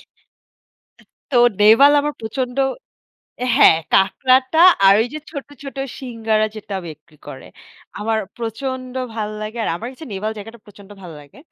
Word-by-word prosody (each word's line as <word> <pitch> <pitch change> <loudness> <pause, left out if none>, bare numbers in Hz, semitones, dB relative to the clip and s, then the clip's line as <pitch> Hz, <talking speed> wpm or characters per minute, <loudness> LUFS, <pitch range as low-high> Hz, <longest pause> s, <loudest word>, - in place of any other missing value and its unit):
আ - - -18 1.3
তো 265 - 0 0.2
নেভাল 225 +8 +7
আমার 295 +1 -2
প্রচণ্ড 245 +3 -4 1.0
হ্যাঁ, 160 - +6 0.2
কাঁকড়াটা 260 +9 +3 0.3
আর 195 - +8
ওইযে 255 +7 -4
ছোট, 280 -3 -7 0.2
ছোট 275 -1 -9 0.2
সিঙ্গারা 225 -4 -1
যেটা 205 -2 -7
বিক্রি 155 0 -14
করে 130 - -10 0.5
আমার 220 +1 -1 0.2
প্রচণ্ড 255 +2 -5 0.2
ভাল 215 -2 -3
লাগে। 215 +2 -6
আর - - -1
আমার 225 +7 -7
কাছে 290 +5 -12
নেভাল 210 +3 -3
জায়গাটা 225 +3 -10
প্রচণ্ড 200 -1 -16
ভালো 175 -3 -10
লাগে। 145 - -19
225 Hz, 140 wpm, -19 LUFS, 210-260 Hz, 1.3 s, আর